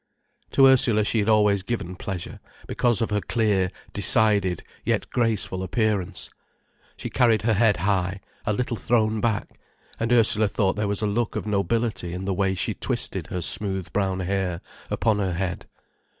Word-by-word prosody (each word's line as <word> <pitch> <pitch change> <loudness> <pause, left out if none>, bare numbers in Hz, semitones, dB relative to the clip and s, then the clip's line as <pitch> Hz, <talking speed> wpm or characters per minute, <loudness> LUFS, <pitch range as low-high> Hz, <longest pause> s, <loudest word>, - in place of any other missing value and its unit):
To 135 - +6
Ursula 125 -5 +4
she 110 - +2
had 105 +1 0
always 105 -2 +3
given 95 -3 -4
pleasure, 90 -2 -6 0.3
because 120 -3 +1
of 110 - -3
her 105 0 0
clear, 105 -6 +1 0.2
decided, 100 -3 +3 0.2
yet - - -1
graceful 110 -6 0
appearance. 105 -1 -1 0.7
She - - -6
carried 115 -3 +3
her 115 0 +2
head 105 0 +3
high, 95 0 -1 0.2
a 105 - -1
little 120 +2 -2
thrown 110 -2 +1
back, 110 -3 -2 0.4
and 115 +1 -1
Ursula 115 -2 +4
thought 100 -2 0
there 105 0 -1
was 100 +1 -2
a - - +2
look 110 +2 -1
of - - -3
nobility 105 -3 -1
in 95 +1 -5
the 100 - -1
way 95 0 0
she 90 - -1
twisted - - -2
her 90 - -4
smooth 95 -1 +1
brown 95 -2 0
hair 90 -2 -2 0.3
upon 110 -2 +1
her 95 -3 -1
head. 90 0 -4
105 Hz, 165 wpm, -24 LUFS, 95-110 Hz, 0.7 s, To